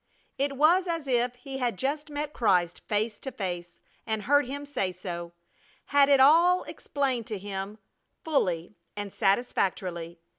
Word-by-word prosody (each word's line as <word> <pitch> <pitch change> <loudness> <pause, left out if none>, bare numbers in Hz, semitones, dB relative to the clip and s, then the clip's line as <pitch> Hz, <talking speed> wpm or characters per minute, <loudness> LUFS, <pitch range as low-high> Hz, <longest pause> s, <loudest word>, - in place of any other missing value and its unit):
It 275 0 0
was 345 +6 +4
as 330 -3 -2
if 245 -1 +1
he 265 +2 -7
had 240 -6 -1
just 295 +5 -2
met 295 0 -4
Christ 180 -7 +2
face 215 0 0
to 265 - -5
face 175 -4 -5 0.3
and 220 -1 -1
heard 285 +2 +3
Him 285 +2 -5
say 250 -10 -1
so; 175 -2 -6 0.5
had 285 -1 +4
it 280 -1 +6
all 335 +7 +6
explained 260 -5 -2
to 215 - -3
him 195 +1 -5 0.5
fully 185 - 0 0.2
and 205 -1 -5
satisfactorily. 185 -5 0
245 Hz, 150 wpm, -28 LUFS, 190-285 Hz, 0.5 s, it